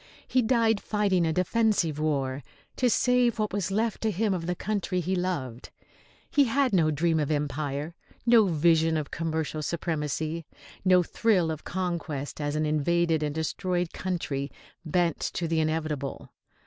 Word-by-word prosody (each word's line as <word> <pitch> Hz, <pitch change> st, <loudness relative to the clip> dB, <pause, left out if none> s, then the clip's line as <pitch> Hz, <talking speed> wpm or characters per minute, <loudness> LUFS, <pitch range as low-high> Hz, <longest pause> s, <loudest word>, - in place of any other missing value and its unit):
He 255 Hz, -, +3 dB
died 225 Hz, -3 st, +2 dB
fighting 195 Hz, -5 st, +1 dB
a -, -, +1 dB
defensive 185 Hz, -3 st, +1 dB
war, 140 Hz, -3 st, -1 dB, 0.3 s
to 250 Hz, -, +2 dB
save 245 Hz, 0 st, +3 dB
what 215 Hz, -2 st, -1 dB
was 200 Hz, -2 st, -1 dB
left 220 Hz, +3 st, -1 dB
to 220 Hz, -, +1 dB
him 210 Hz, +1 st, 0 dB
of 170 Hz, -2 st, -3 dB
the 180 Hz, -, 0 dB
country 195 Hz, -2 st, -2 dB
he 180 Hz, +2 st, -1 dB
loved. 145 Hz, -10 st, -3 dB, 0.6 s
He 285 Hz, -1 st, +4 dB
had 260 Hz, 0 st, +1 dB
no 165 Hz, -4 st, +4 dB
dream 160 Hz, +2 st, +1 dB
of 150 Hz, -, -1 dB
empire, 145 Hz, +1 st, -2 dB, 0.3 s
no 230 Hz, -3 st, +6 dB
vision 160 Hz, -1 st, +3 dB
of 150 Hz, -2 st, -4 dB
commercial 160 Hz, -1 st, -2 dB
supremacy, 160 Hz, 0 st, -2 dB, 0.4 s
no 185 Hz, -1 st, +5 dB
thrill 185 Hz, -4 st, +1 dB
of 155 Hz, -1 st, -6 dB
conquest 170 Hz, -6 st, -3 dB
as 145 Hz, 0 st, -1 dB
an 155 Hz, 0 st, +1 dB
invaded 160 Hz, +2 st, +1 dB
and 150 Hz, -1 st, -2 dB
destroyed 175 Hz, +2 st, -1 dB
country 145 Hz, -7 st, -3 dB, 0.3 s
bent 170 Hz, 0 st, +1 dB
to 170 Hz, -, -2 dB
the 165 Hz, 0 st, +1 dB
inevitable. 155 Hz, -3 st, -2 dB
170 Hz, 155 wpm, -27 LUFS, 155-195 Hz, 0.6 s, no